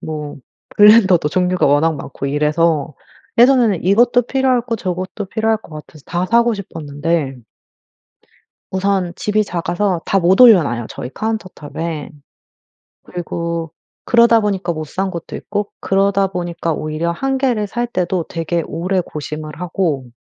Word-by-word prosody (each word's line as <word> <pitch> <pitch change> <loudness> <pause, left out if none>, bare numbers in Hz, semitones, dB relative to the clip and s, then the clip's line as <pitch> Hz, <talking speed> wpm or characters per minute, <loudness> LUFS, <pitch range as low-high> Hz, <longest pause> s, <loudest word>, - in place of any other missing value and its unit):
뭐 150 -2 -6 0.4
블랜더도 205 -6 +6
종류가 180 +3 +1
워낙 150 +3 +3
많고 140 0 -6
이래서 150 +1 +1 0.4
예전에는 240 -7 +4
이것도 240 +6 +4
필요하고 250 -2 0
저것도 185 +1 -4
필요할 220 +2 0
것 165 -7 -14
같아서 150 -1 -12
다 175 +1 -1
사고 235 +2 +3
싶었는데 155 -6 -3 1.4
우선 190 -2 0
집이 215 0 0
작아서 175 +1 -1
다 195 - +1
못 185 +3 +3
올려놔요. 155 - +6
저희 125 - -6
카운터 220 -3 -3
탑에. 155 +1 -5 0.9
그리고 170 -2 -4 0.3
그러다 235 -1 +5
보니까 195 -4 -1
못 155 -1 -5
산 190 +5 -3
것도 170 -2 -7
있고 205 0 -4
그러다 195 0 +2
보니까 175 -2 -3
오히려 155 +2 -2
1 270 +8 -1
개를 245 -6 0
살 240 +3 -2
때도 180 -5 -1
되게 165 0 -2
오래 185 +3 -1
고심을 155 -1 -7
하고 170 -7 -1
180 Hz, 300 characters per minute, -18 LUFS, 160-210 Hz, 1.4 s, 블랜더도